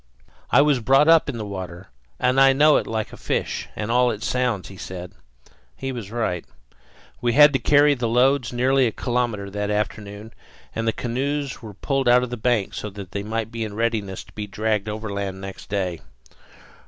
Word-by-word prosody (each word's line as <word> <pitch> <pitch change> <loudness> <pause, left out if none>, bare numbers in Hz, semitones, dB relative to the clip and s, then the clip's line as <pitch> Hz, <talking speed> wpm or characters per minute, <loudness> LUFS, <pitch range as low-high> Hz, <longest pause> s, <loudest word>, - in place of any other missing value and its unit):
"I 140 - +6
was 145 -3 +3
brought 135 +5 +4
up 165 -2 +5
in 130 - -4
the 110 - -4
water, 95 -2 -7 0.3
and 130 +1 +3
I 135 0 +7
know 150 +2 +5
it - - -2
like 110 -1 -3
a - - -9
fish, - - -2
and 105 +1 -3
all 125 +1 +4
its 110 0 -4
sounds," 125 -6 0 0.2
said 90 -1 -7 0.7
he. - - -8
He 135 - -1
was 115 -6 -6
right. 105 -7 -2 0.8
We 120 -1 +1
had 150 +1 +7
to 135 - +2
carry 145 +4 +5
the 125 -4 -2
loads 125 +2 +2
nearly 130 +1 +3
a - - -1
kilometre 120 -5 -2
that 105 +1 -3
afternoon, 105 +1 -4 0.4
and 115 0 -2
the - - +4
canoes 135 +4 -3
were 105 -4 -10
pulled 135 +1 0
out 125 +1 +5
on 125 - -3
the 125 - -3
bank 115 -3 0
so 105 - -5
that 100 -2 -10
they 100 - -3
might 110 +1 -3
be 115 -1 -3
in 105 -2 -6
readiness 110 -4 -2
to - - -21
be 105 -1 -5
dragged 105 0 -1
overland 100 -3 -4
next 95 0 -9
day. 95 -4 -2
115 Hz, 200 wpm, -23 LUFS, 100-125 Hz, 0.8 s, I